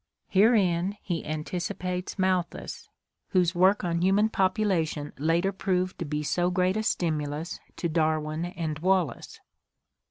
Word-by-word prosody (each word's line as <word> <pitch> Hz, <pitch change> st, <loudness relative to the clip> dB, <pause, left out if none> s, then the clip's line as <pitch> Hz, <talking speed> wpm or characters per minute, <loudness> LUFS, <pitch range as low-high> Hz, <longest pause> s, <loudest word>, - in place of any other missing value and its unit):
Herein 195 Hz, -3 st, +3 dB
he 175 Hz, -4 st, -2 dB
anticipates 180 Hz, +4 st, -3 dB
Malthus, 185 Hz, -2 st, -1 dB, 0.4 s
whose 180 Hz, -2 st, +2 dB
work 190 Hz, +3 st, +4 dB
on 170 Hz, -1 st, 0 dB
human 200 Hz, +4 st, +3 dB
population 185 Hz, -7 st, 0 dB
later 165 Hz, +5 st, +2 dB
proved 185 Hz, -1 st, -1 dB
to 170 Hz, -, -2 dB
be 150 Hz, 0 st, -2 dB
so 175 Hz, +4 st, +1 dB
great 180 Hz, +1 st, +1 dB
a 215 Hz, -, 0 dB
stimulus 155 Hz, -4 st, -2 dB, 0.2 s
to 170 Hz, -, -2 dB
Darwin 155 Hz, 0 st, 0 dB
and 165 Hz, -4 st, -4 dB
Wallace. 185 Hz, -2 st, 0 dB
175 Hz, 125 wpm, -27 LUFS, 160-190 Hz, 0.4 s, work